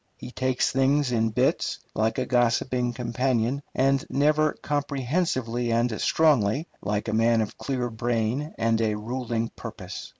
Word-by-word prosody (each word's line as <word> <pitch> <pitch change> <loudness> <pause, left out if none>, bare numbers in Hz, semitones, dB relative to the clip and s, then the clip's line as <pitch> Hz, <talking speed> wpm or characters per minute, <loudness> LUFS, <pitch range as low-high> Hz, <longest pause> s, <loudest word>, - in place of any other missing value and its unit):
He 125 - -9
takes 130 0 0
things 135 +1 +2
in 115 -2 +2
bits, 110 - +1 0.2
like 110 +1 0
a - - 0
gossiping 120 0 +1
companion, 125 +2 0
and 135 +1 +2
never 150 +2 +2
comprehensively 135 -4 -1
and 115 -1 0
strongly, 145 -2 +2
like 105 +2 -2
a 110 - -1
man 115 +1 +3
of 110 -2 -2
clear 130 -3 -2
brain 120 +5 -1
and 115 0 +1
a 110 -1 +1
ruling 115 0 -3
purpose. - - -8
125 Hz, 140 wpm, -26 LUFS, 115-135 Hz, 0.2 s, man